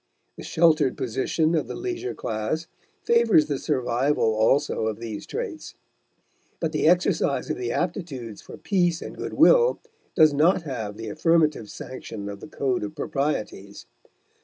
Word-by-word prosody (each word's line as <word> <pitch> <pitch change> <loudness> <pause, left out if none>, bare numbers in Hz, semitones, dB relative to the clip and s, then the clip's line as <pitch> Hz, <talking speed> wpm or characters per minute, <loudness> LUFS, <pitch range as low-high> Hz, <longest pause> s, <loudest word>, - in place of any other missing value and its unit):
The - - -10
sheltered 155 -5 +3
position 145 +7 0
of 160 - 0
the - - -6
leisure 365 +1 -4
class 110 +9 -3 0.4
favors 230 -9 +4
the 145 -3 -3
survival 130 -3 +1
also 110 +2 +2
of 110 - -2
these 110 -3 -7
traits; 435 -10 -6 0.8
but 165 -2 -1
the 155 0 +1
exercise 175 -4 +2
of - - -3
the 120 -1 -3
aptitudes 140 - -4
for - - -11
peace 175 -4 0
and - - -8
good - - -6
will - - +5 0.4
does 155 -2 +6
not 165 +5 +3
have 110 -8 -5
the 115 -1 -6
affirmative 155 -3 +1
sanction 110 -5 -7
of 100 0 -7
the - - -10
code 135 -6 -1
of 100 - -6
proprieties. 105 -8 -3
150 Hz, 150 wpm, -25 LUFS, 115-170 Hz, 0.8 s, does